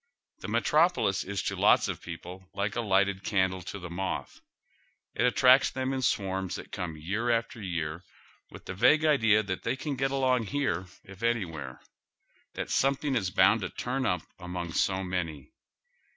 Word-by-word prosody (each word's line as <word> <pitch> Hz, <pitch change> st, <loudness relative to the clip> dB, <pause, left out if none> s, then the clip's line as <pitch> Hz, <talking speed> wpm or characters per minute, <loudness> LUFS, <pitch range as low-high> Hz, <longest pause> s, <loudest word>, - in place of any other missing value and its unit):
The -, -, -7 dB
metropolis 155 Hz, -, +2 dB
is 100 Hz, 0 st, -3 dB
to -, -, -2 dB
lots -, -, +4 dB
of -, -, -4 dB
people 90 Hz, +1 st, -9 dB
like 100 Hz, +1 st, -1 dB
a 120 Hz, -, 0 dB
lighted 100 Hz, -2 st, +1 dB
can 95 Hz, -3 st, +2 dB
dle 95 Hz, 0 st, -6 dB
to 100 Hz, -, -6 dB
the 90 Hz, -3 st, -8 dB
moth. 95 Hz, +2 st, -4 dB, 0.7 s
It 125 Hz, -, +2 dB
attracts 130 Hz, +2 st, +5 dB
them 130 Hz, 0 st, -2 dB
in 130 Hz, -, -2 dB
swarms 95 Hz, -5 st, -1 dB
that -, -, -9 dB
come 85 Hz, -3 st, -4 dB
year 100 Hz, +10 st, -2 dB
after 115 Hz, -1 st, 0 dB
year 85 Hz, -3 st, -3 dB, 0.5 s
with -, -, -13 dB
the -, -, -5 dB
vague 125 Hz, +11 st, +4 dB
idea 110 Hz, -8 st, +4 dB
that 95 Hz, -2 st, -4 dB
they 115 Hz, -, -1 dB
can 140 Hz, +1 st, -4 dB
get 135 Hz, +1 st, 0 dB
along 130 Hz, -4 st, +1 dB
here 95 Hz, -11 st, -1 dB, 0.2 s
if 100 Hz, +2 st, -13 dB
anywhere; 80 Hz, -, -2 dB, 0.8 s
that -, -, -4 dB
sometliing 135 Hz, +1 st, +1 dB
is 100 Hz, -6 st, 0 dB
bound 100 Hz, +4 st, +4 dB
to 90 Hz, -, -3 dB
turn 130 Hz, +1 st, -2 dB
up 90 Hz, -2 st, 0 dB, 0.2 s
among 90 Hz, -1 st, -5 dB
so 95 Hz, +2 st, +1 dB
many. 90 Hz, -, -4 dB
100 Hz, 175 wpm, -29 LUFS, 90-125 Hz, 0.8 s, attracts